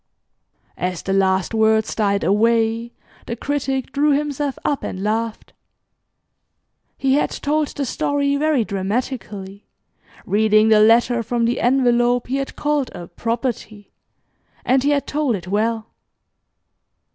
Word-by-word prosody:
As 180 Hz, 0 st, -3 dB
the 195 Hz, -, -1 dB
last 190 Hz, 0 st, +1 dB
words 220 Hz, 0 st, +2 dB
died 200 Hz, -2 st, 0 dB
away, 230 Hz, +2 st, +1 dB, 0.4 s
the 235 Hz, -, -3 dB
Critic 270 Hz, 0 st, -2 dB
drew 290 Hz, +1 st, +2 dB
himself 290 Hz, -1 st, -2 dB
up 285 Hz, -, 0 dB
and 190 Hz, -, -5 dB
laughed. 225 Hz, +1 st, -2 dB, 1.4 s
He 270 Hz, -1 st, +1 dB
had 290 Hz, -, +2 dB
told 300 Hz, +1 st, -1 dB
the 280 Hz, -, -4 dB
story 280 Hz, +2 st, 0 dB
very 290 Hz, -5 st, +1 dB
dramatically, 200 Hz, -1 st, -4 dB, 0.6 s
reading 215 Hz, +1 st, +3 dB
the 215 Hz, -1 st, +6 dB
letter 230 Hz, +2 st, +4 dB
from 235 Hz, +1 st, -1 dB
the 240 Hz, +2 st, 0 dB
envelope 245 Hz, -1 st, +2 dB
he 265 Hz, +2 st, -2 dB
had 275 Hz, 0 st, -4 dB
called 295 Hz, -3 st, 0 dB
a 175 Hz, -, -8 dB
"property," 230 Hz, 0 st, -4 dB, 0.7 s
and 260 Hz, +1 st, +3 dB
he 280 Hz, -, +1 dB
had 285 Hz, -1 st, +1 dB
told 290 Hz, -5 st, 0 dB
it 180 Hz, -2 st, -8 dB
well. 220 Hz, +3 st, -1 dB
235 Hz, 130 wpm, -20 LUFS, 215-270 Hz, 1.4 s, the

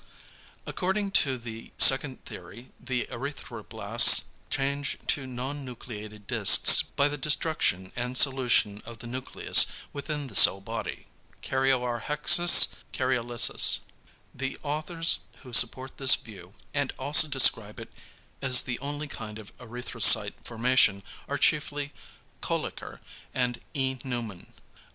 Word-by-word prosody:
According 195 Hz, +2 st, -4 dB
to 135 Hz, -8 st, 0 dB
the 115 Hz, -1 st, -11 dB
second 135 Hz, 0 st, +3 dB
theory 100 Hz, +8 st, -13 dB
the 125 Hz, 0 st, -5 dB
erythroblasts 135 Hz, +4 st, +2 dB, 0.3 s
change 140 Hz, +1 st, -4 dB
to 135 Hz, -2 st, -1 dB
non 130 Hz, +3 st, -7 dB
nucleated 110 Hz, -4 st, -11 dB
discs -, -, +6 dB
by 140 Hz, -, -2 dB
the 145 Hz, 0 st, -6 dB
destruction 135 Hz, -, -2 dB
and 125 Hz, +1 st, -4 dB
solution 125 Hz, -7 st, +1 dB
of 115 Hz, 0 st, -12 dB
the 115 Hz, -, -13 dB
nucleus 130 Hz, +2 st, +1 dB, 0.3 s
within 145 Hz, 0 st, -6 dB
the 125 Hz, -, -13 dB
cell 95 Hz, 0 st, +6 dB
body. 95 Hz, -, -8 dB, 0.4 s
("Karyorrhexis," 135 Hz, +6 st, +3 dB, 0.2 s
"Karyolysis.") 120 Hz, -3 st, +1 dB, 0.5 s
The 135 Hz, -1 st, -6 dB
authors 155 Hz, +3 st, -2 dB, 0.2 s
who 125 Hz, -3 st, -14 dB
support 130 Hz, +3 st, +2 dB
this 135 Hz, -2 st, +5 dB
view 100 Hz, -4 st, -15 dB, 0.2 s
and 145 Hz, -2 st, -3 dB
also 145 Hz, +4 st, +3 dB
describe 115 Hz, -6 st, +1 dB
it -, -, -12 dB, 0.5 s
as 130 Hz, -2 st, +4 dB
the 120 Hz, -2 st, -6 dB
only 145 Hz, +1 st, -7 dB
kind 110 Hz, -6 st, -10 dB
of 110 Hz, -2 st, -15 dB
erythrocyte 120 Hz, 0 st, +3 dB
formation 115 Hz, -4 st, 0 dB, 0.2 s
are 145 Hz, -, -4 dB
chiefly 145 Hz, 0 st, -2 dB, 0.5 s
Kölliker -, -, -6 dB, 0.3 s
and 125 Hz, -2 st, -3 dB
E. 130 Hz, -2 st, -3 dB
Neumann. 120 Hz, -8 st, -8 dB
130 Hz, 120 wpm, -25 LUFS, 115-145 Hz, 0.5 s, discs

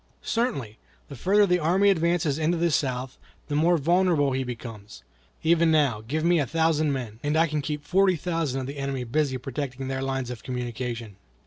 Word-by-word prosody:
"Certainly. 180 Hz, -, -2 dB, 0.3 s
The 140 Hz, -, -8 dB
further 200 Hz, -, +3 dB
the 180 Hz, -3 st, +1 dB
enemy 190 Hz, +5 st, +4 dB
advances 165 Hz, -4 st, +1 dB
into 165 Hz, +2 st, +1 dB
the 170 Hz, 0 st, +1 dB
South, 130 Hz, -2 st, -1 dB, 0.3 s
the 145 Hz, -, -1 dB
more 170 Hz, +3 st, +4 dB
vulnerable 165 Hz, -2 st, +2 dB
he 130 Hz, 0 st, -1 dB
becomes. 115 Hz, -, -8 dB, 0.4 s
Even 165 Hz, 0 st, +4 dB
now, 145 Hz, -9 st, +2 dB
give 150 Hz, +8 st, -3 dB
me 170 Hz, 0 st, +4 dB
a 140 Hz, -, 0 dB
thousand 160 Hz, -1 st, +1 dB
men, 120 Hz, -5 st, -5 dB
and 150 Hz, +2 st, 0 dB
I 165 Hz, -, +5 dB
can 155 Hz, -2 st, -2 dB
keep 150 Hz, 0 st, -4 dB
forty 190 Hz, +2 st, +3 dB
thousand 160 Hz, -5 st, -2 dB
of -, -, -4 dB
the 140 Hz, +2 st, -6 dB
enemy 135 Hz, -2 st, -2 dB
busy 130 Hz, +2 st, 0 dB
protecting 135 Hz, 0 st, -5 dB
their 135 Hz, 0 st, -2 dB
lines 135 Hz, -2 st, -2 dB
of 120 Hz, -, -7 dB
communication." 120 Hz, -4 st, -5 dB
145 Hz, 190 wpm, -26 LUFS, 130-165 Hz, 0.4 s, I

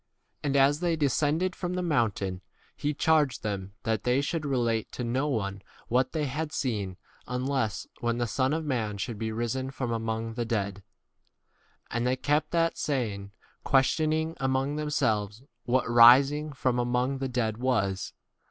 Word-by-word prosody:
And 140 Hz, -2 st, -1 dB
as 140 Hz, +2 st, +4 dB
they 175 Hz, -1 st, +1 dB
de 155 Hz, -2 st, +1 dB
scended 155 Hz, +7 st, +1 dB
from 180 Hz, -1 st, -4 dB
the 180 Hz, -, -1 dB
mountain, 105 Hz, -, 0 dB, 0.3 s
he 145 Hz, -, -1 dB
charged 150 Hz, -2 st, +2 dB
them 100 Hz, -2 st, -4 dB
that 110 Hz, -3 st, -1 dB
they 125 Hz, +2 st, +2 dB
should 150 Hz, +1 st, -2 dB
relate 120 Hz, -5 st, 0 dB
to 125 Hz, -, -4 dB
no 130 Hz, +5 st, 0 dB
one 100 Hz, -8 st, -2 dB, 0.3 s
what 130 Hz, +2 st, +2 dB
they 155 Hz, -2 st, -1 dB
had 150 Hz, +3 st, -3 dB
seen 105 Hz, -11 st, -2 dB, 0.3 s
unless 125 Hz, -3 st, -1 dB
when 120 Hz, 0 st, 0 dB
the 120 Hz, -, 0 dB
Son 130 Hz, +4 st, 0 dB
of 160 Hz, +1 st, -1 dB
man 110 Hz, -7 st, -1 dB
should 110 Hz, +1 st, -4 dB
be 110 Hz, -1 st, -2 dB
risen 120 Hz, +4 st, -2 dB
from 130 Hz, -3 st, -3 dB
among 115 Hz, 0 st, -2 dB
[the] 120 Hz, +1 st, -2 dB
10 -, -, -7 dB
dead. 100 Hz, -3 st, -2 dB, 1.1 s
And 120 Hz, +1 st, 0 dB
they 130 Hz, -, +2 dB
kept 150 Hz, +3 st, 0 dB
that 165 Hz, -1 st, +1 dB
saying, 105 Hz, -9 st, -2 dB, 0.3 s
questioning 155 Hz, +4 st, +2 dB
among 135 Hz, +2 st, 0 dB
themselves 120 Hz, -8 st, -1 dB
i -, -, -25 dB, 0.2 s
what 130 Hz, +1 st, +2 dB
k -, -, -3 dB
rising 135 Hz, +6 st, +7 dB
from 125 Hz, -2 st, 0 dB
among 125 Hz, +2 st, 0 dB
[the] 135 Hz, -, -2 dB
11 130 Hz, -, -4 dB
dead 110 Hz, -3 st, 0 dB
was. 110 Hz, -7 st, 0 dB
125 Hz, 175 wpm, -28 LUFS, 115-145 Hz, 1.1 s, rising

